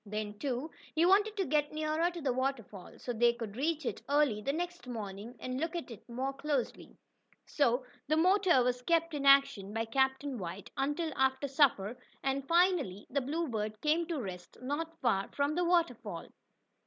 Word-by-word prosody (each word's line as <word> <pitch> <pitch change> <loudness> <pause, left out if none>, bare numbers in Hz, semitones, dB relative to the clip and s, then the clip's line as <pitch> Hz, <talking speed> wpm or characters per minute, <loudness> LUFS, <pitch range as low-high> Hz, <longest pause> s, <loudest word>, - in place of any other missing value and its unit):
Then, 210 0 -5
too, 275 +3 -2 0.2
he 325 +2 +4
wanted 410 +3 +4
to 385 - +1
get 295 -1 +1
nearer 310 +2 0
to 345 -1 -7
the 270 -4 +1
waterfall, 245 -7 -3
so 245 - -4
they 235 +1 +4
could 230 -4 -7
reach 305 +3 -1
it - - -3
early 285 -7 +3
the 275 - 0
next 350 -1 -4
morning 215 0 -6
and 255 0 -4
look 325 +3 -2
at 335 -7 -5
it 225 +1 -12
more 260 +3 -2
closely. 275 -2 -3 0.5
So 255 -3 +1 0.2
the 310 +2 +2
motor 365 -5 +4
was 250 0 0
kept 330 +3 +1
in 280 -1 -1
action 275 -8 +5
by 225 +1 -1
Captain 265 +2 0
White 180 +2 -6
until 295 +4 -1
after 265 +1 +1
supper, 250 -5 +2 0.2
and 270 0 -1
finally 340 - +2
the 280 - +1
Bluebird 245 -8 -2
came 320 +2 +2
to 335 -4 -2
rest 180 -6 -7
not 320 +5 -3
far 200 -6 +1
from 285 +1 0
the 355 +3 +1
waterfall. 340 -1 0
275 Hz, 180 wpm, -32 LUFS, 235-320 Hz, 0.5 s, action